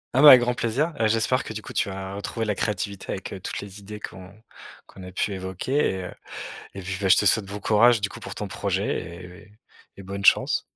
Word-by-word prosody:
Ah, 135 Hz, -, +5 dB
bah, 150 Hz, -, +9 dB
avec 125 Hz, -2 st, +10 dB
grand 125 Hz, 0 st, +1 dB
plaisir! 130 Hz, +8 st, -1 dB
Heu, 110 Hz, -, +3 dB
j'espère 115 Hz, +4 st, +1 dB
que, -, -, -7 dB
du 110 Hz, 0 st, -6 dB
coup, -, -, -9 dB
tu -, -, 0 dB
vas, 95 Hz, 0 st, -6 dB
heu, -, -, -6 dB
retrouver 110 Hz, +2 st, -3 dB
la 105 Hz, -, 0 dB
créativité 100 Hz, -1 st, -3 dB
avec, 95 Hz, -, -6 dB
heu, 95 Hz, -, -6 dB
toutes 90 Hz, -, -5 dB
les 100 Hz, 0 st, -10 dB
idées 105 Hz, +1 st, -9 dB
qu'on 95 Hz, 0 st, -9 dB, 0.5 s
qu'on 95 Hz, -, -14 dB
a 90 Hz, 0 st, -9 dB
pu 100 Hz, +2 st, -1 dB
évoquer 95 Hz, +7 st, -5 dB, 0.2 s
et 95 Hz, -1 st, -3 dB
heu 90 Hz, -, -7 dB, 0.6 s
et 95 Hz, -, -7 dB
puis, 95 Hz, +1 st, -4 dB
bah, 95 Hz, -, +1 dB
je -, -, +7 dB
te -, -, +3 dB
souhaite 100 Hz, 0 st, +4 dB
bon 100 Hz, +1 st, -6 dB
courage, 115 Hz, +3 st, +4 dB
du 100 Hz, -, 0 dB
coup, 115 Hz, -, -11 dB
pour -, -, -8 dB
ton 105 Hz, -, -4 dB
projet 100 Hz, +1 st, -1 dB, 0.3 s
et 90 Hz, +2 st, -13 dB
et 100 Hz, -, -22 dB, 0.4 s
et 100 Hz, -, -10 dB
bonne 100 Hz, +1 st, -6 dB
chance. -, -, +4 dB
100 Hz, 255 wpm, -25 LUFS, 95-110 Hz, 0.6 s, avec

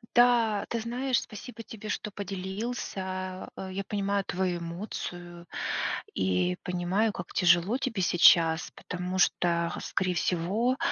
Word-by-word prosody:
Да, 235 Hz, -4 st, +5 dB
ты 230 Hz, -, -1 dB
знаешь, 250 Hz, +2 st, 0 dB
спасибо 230 Hz, +3 st, -9 dB
тебе, 215 Hz, -1 st, -9 dB
что 210 Hz, -, -2 dB
поделился. 190 Hz, -1 st, -4 dB
Э, 190 Hz, -, -6 dB
я 195 Hz, +1 st, -3 dB
понимаю 200 Hz, 0 st, 0 dB
твою 180 Hz, -1 st, -1 dB
эмоцию 175 Hz, -1 st, -6 dB, 0.7 s
и 90 Hz, -1 st, +1 dB
понимаю, 180 Hz, +4 st, +1 dB
как 175 Hz, -, -7 dB
тяжело 180 Hz, +5 st, +4 dB
тебе 230 Hz, -8 st, -2 dB
сейчас, 165 Hz, -2 st, +5 dB
потому 180 Hz, +1 st, -4 dB
что, 170 Hz, -2 st, +2 dB
э, -, -, -5 dB
скорее 185 Hz, -1 st, 0 dB
всего, 200 Hz, +11 st, +1 dB
190 Hz, 125 wpm, -29 LUFS, 175-215 Hz, 0.7 s, Да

